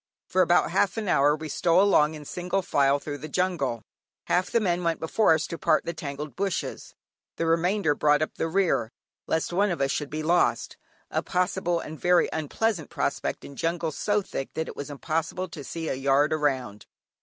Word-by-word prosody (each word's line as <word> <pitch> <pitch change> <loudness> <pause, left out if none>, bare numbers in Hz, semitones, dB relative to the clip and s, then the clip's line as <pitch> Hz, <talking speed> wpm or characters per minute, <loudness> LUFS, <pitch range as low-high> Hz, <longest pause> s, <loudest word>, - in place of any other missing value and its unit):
For - - +2
about - - +3
half - - +1
an 215 -2 -2
hour 145 -3 +4
we 155 0 -7
stole 170 +3 +2
along 155 -6 +4
in 150 -1 -10
single 180 +4 -2
file 140 -3 +3
through 145 0 -6
the 155 - -7
jungle. 150 -10 -1 0.4
Half 180 +1 +1
the 235 - +2
men 180 -4 0
went 165 -1 0
before 160 +2 +3
us 155 -1 -1
to 170 - -6
part - - +2
the 170 - -3
tangled 145 -3 -6
bushes, 195 +1 -3 0.4
the 165 - -1
remainder 165 +1 +2
brought 150 +1 +3
up - - -4
the 165 - -2
rear, 165 - +1 0.4
lest 160 +2 -1
one 200 +3 +2
of 175 - -2
us 135 0 +1
should 150 -2 -2
be 155 +1 -4
lost; 175 +3 +1 0.4
a - - 0
possible 180 -1 0
and 155 -1 -8
very 180 0 +4
unpleasant 160 +3 -1
prospect - - -2
in 140 - -10
jungle 165 +1 -1
so 205 +7 0
thick 135 - -5
that 160 - -2
it - - -7
is 145 - -6
impossible 165 +5 -2
to 155 -3 -8
see 165 +3 -5
a - - 0
yard 140 +3 +2
around. 130 -9 -1
160 Hz, 200 wpm, -26 LUFS, 145-180 Hz, 0.4 s, hour